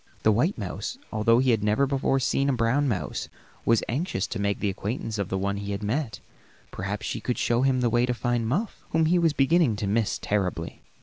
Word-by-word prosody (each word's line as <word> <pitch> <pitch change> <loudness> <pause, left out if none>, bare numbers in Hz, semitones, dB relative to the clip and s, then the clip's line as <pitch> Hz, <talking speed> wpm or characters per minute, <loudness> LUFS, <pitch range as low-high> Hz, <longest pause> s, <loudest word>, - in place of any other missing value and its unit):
The 110 - +5
white 150 - +1
mouse, 260 - -4 0.2
although 110 +2 +4
he 130 0 +3
had 110 -3 +1
never 105 +6 +3
before 135 0 +1
seen 135 +2 +1
a - - +2
brown 125 +4 +2
mouse, 105 -8 -2 0.4
was 115 -1 +3
anxious 150 +11 -1
to 115 - -5
make 100 0 0
the 105 - 0
acquaintance 110 +2 -4
of 100 - -2
the 95 - -1
one 100 +1 -1
he 100 0 -4
had 100 +1 -4
met; 115 +3 -2 0.5
perhaps 100 +2 -4
she - - -3
could 125 - -2
show 120 +1 +1
him 130 -1 +2
the 120 - +2
way 120 +1 +3
to 125 - +1
find 120 -1 0
Muff, 190 - -2
whom 160 0 +2
he 175 +3 +3
was 165 -3 +3
beginning 140 -3 +3
to 105 0 -3
miss 105 +2 +1
terribly. 100 -4 -2
120 Hz, 225 wpm, -26 LUFS, 105-135 Hz, 0.5 s, The